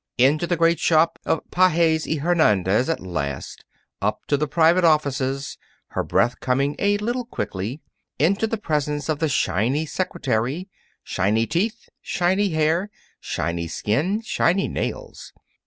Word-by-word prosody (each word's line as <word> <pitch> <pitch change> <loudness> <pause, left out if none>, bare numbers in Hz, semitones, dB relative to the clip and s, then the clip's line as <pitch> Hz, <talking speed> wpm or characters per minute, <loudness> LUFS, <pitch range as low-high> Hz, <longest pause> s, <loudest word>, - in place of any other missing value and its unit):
Into 145 +7 +3
the 175 - 0
great 165 +1 +3
shop 165 0 +3
of 160 - +1
Pages 170 -3 +3
y 160 - 0
Hernandez 130 - +2
at 165 - 0
last, 70 -7 -5 0.4
up 105 +1 -2
to 145 - +4
the 150 +2 -1
private 170 +4 +3
offices, 140 -4 +1 0.3
her - - -2
breath 120 +2 +1
coming 135 +3 0
a 205 0 +2
little 240 +4 -2
quickly, 105 - -5 0.4
into 195 +8 +2
the 225 - -2
presence 150 -5 -2
of 155 -2 0
the 160 -1 +1
shiny 130 +4 +1
secretary 145 - -2 0.4
shiny 110 +4 +1
teeth, 210 - -2
shiny 190 +3 +1
hair, 160 +4 +1 0.3
shiny 85 0 -3
skin, 145 - -1
shiny 195 -3 +1
nails. - - -5
155 Hz, 140 wpm, -23 LUFS, 125-175 Hz, 0.4 s, to